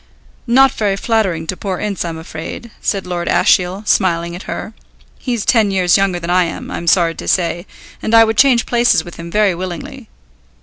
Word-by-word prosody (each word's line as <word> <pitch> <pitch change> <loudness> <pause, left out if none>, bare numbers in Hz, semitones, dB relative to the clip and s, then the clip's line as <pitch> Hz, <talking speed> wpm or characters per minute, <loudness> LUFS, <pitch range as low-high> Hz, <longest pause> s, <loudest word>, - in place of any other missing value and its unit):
"Not 265 +2 +5
very 205 -3 -1
flattering 195 -6 -1
to 185 - -3
poor 190 -1 -4
Ince 200 -3 -3
I'm 165 -2 -5
afraid," 165 +7 -8
said 195 -2 -1
Lord 175 -1 -4
Ashiel, 185 +3 +2
smiling 170 -3 +1
at 180 - -10
her. 220 - -5 0.5
"He's 240 -5 -3
ten 225 -4 +3
years 185 -3 +2
younger 195 -2 +1
than 170 +1 -4
I 180 0 +3
am, 165 - -6
I'm 170 - -5
sorry 170 -1 +3
to - - -9
say, 175 0 0 0.3
and 225 - +1
I 225 - +8
would 225 0 0
change 250 0 +4
places 240 -8 +2
with 175 - -11
him 170 0 -8
very 210 +1 +2
willingly. 180 0 -7
185 Hz, 190 wpm, -16 LUFS, 175-220 Hz, 0.5 s, I